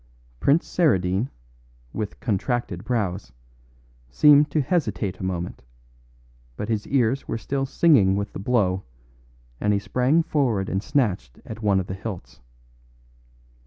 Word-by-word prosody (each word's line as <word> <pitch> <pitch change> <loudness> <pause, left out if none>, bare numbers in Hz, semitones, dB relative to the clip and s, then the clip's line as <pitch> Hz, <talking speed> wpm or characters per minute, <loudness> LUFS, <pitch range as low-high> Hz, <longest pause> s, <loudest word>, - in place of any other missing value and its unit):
Prince 150 +5 +3
Saradine, 100 - +1 0.6
with 105 -2 -5
contracted 110 -4 -2
brows, 100 - -2 0.8
seemed 150 - +5
to 155 - 0
hesitate 135 - -1
a - - -6
moment, 90 -6 -4 0.9
but 105 - -4
his 110 -2 -1
ears 130 0 +1
were - - -2
still 135 +3 -2
singing 130 - +4
with 100 0 -3
the - - -6
blow, 100 -4 +1 0.8
and 105 0 +1
he - - +2
sprang 130 +10 +1
forward 120 -12 0
and 95 - -1
snatched 105 - -1
at 110 0 -8
one 100 -3 +2
of 95 - -3
the 95 - -5
hilts. 95 -1 -7
110 Hz, 130 wpm, -24 LUFS, 95-135 Hz, 0.9 s, seemed